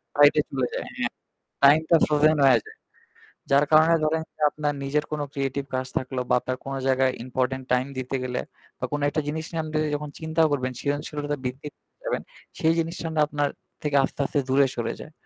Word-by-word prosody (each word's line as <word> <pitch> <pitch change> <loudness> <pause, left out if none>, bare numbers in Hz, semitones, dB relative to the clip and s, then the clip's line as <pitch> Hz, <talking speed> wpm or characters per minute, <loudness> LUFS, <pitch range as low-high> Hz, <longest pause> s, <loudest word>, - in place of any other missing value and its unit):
Side 145 0 +7
এ - - +6
চলে 130 -2 -1
যায়। - - -2
হ্যাঁ - - 0 0.5
টাইম 145 +3 +8
টা 170 - +7
ফ্রোজেন 150 +1 +4
হয়ে 125 -4 +6
যায়। - - -13 0.8
যার 140 +2 +5
কারণে 160 +2 +6
ধরেন 160 +1 +1
যে - - -17
আপনার 145 0 -2
নিজের 150 +2 0
কোন 150 - -2
ক্রিয়েটিভ 140 -1 -2
কাজ 130 0 -2
থাকলো 130 0 -2
বা - - +3
আপনার 130 0 -4
কোন 135 - -4
জায়গায় 130 0 +3
ইম্পোর্টেন্ট 130 +1 -1
টাইম 125 +1 +2
দিতে 130 +1 -3
গেলে 125 - -2 0.4
বা - - -1
কোন 145 - -1
একটা 155 +2 -1
জিনিস 160 +1 -3
নিয়ে 165 -1 -1
আপনি 155 0 -3 0.2
যখন 150 0 -5
চিন্তাও 160 0 +2
করবেন 130 -3 0
সৃজনশীলতা 145 0 -2
বৃদ্ধি 130 +4 -4
করতে - - -53
যাবেন। - - -1 0.4
সেই 160 +1 +3
জিনিসটা 165 0 -3
না - - +1
আপনার 145 -1 0 0.4
থেকে 150 -1 -1
আস্তে, 135 - -4
আস্তে 145 - 0
দূরে 135 +1 +4
সরে 115 -1 -2
যায়। 155 - -11
145 Hz, 200 wpm, -25 LUFS, 130-155 Hz, 0.8 s, টাইম